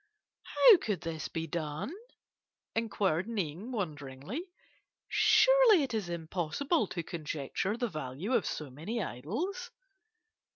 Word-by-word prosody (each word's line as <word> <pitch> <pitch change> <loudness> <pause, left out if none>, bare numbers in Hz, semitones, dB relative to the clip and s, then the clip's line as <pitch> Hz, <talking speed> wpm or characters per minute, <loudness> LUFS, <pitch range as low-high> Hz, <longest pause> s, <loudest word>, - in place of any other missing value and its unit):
"'How 470 -6 +7
could 210 - -2
this 160 -3 -4
be 165 0 -4
done?' 155 - -4 0.8
inquired 200 -6 0
Ning 200 - -3
wonderingly. 160 - -5 0.6
'Surely 430 -2 +6
it 265 - -3
is 210 -5 -2
impossible 175 - -1
to 170 -2 -4
conjecture 160 - -3
the 240 0 0
value 155 - -4
of - - +2
so 150 -4 -4
many 195 - -3
idols. 280 - -4
190 Hz, 115 wpm, -31 LUFS, 155-260 Hz, 0.8 s, How